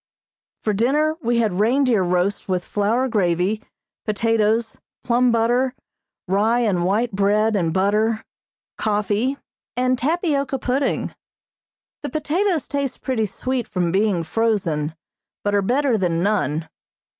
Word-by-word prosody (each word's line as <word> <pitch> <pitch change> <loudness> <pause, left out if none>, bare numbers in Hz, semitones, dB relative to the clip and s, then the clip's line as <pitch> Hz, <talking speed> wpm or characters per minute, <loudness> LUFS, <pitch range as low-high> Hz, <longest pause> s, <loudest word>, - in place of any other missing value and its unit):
For 215 - +1
dinner 295 +9 +2
we 235 -2 +1
had 210 -5 +1
reindeer 240 0 +3
roast 180 +3 0
with 180 -1 -1
flour 225 +6 +1
gravy, 195 -1 +1 0.4
potatoes, 225 +1 +1 0.2
plum 245 0 +3
butter, 240 +3 +1 0.5
rye 215 +6 +2
and 195 -7 +1
white 220 +6 +1
bread 210 +2 +2
and 170 -5 +1
butter, 210 +5 +1 0.5
coffee 210 +5 0 0.4
and 255 0 +1
tapioca 285 -2 0
pudding. 260 +2 -1 0.9
The - - -4
potatoes 320 +2 0
taste 280 -2 -3
pretty 230 -5 0
sweet 255 +4 -3
from 175 -2 -1
being 195 -2 +1
frozen, 165 -6 0 0.5
but 205 - 0
are 200 - +3
better 250 +2 +1
than 170 -2 0
none. 165 -7 0
220 Hz, 120 wpm, -22 LUFS, 195-255 Hz, 0.9 s, reindeer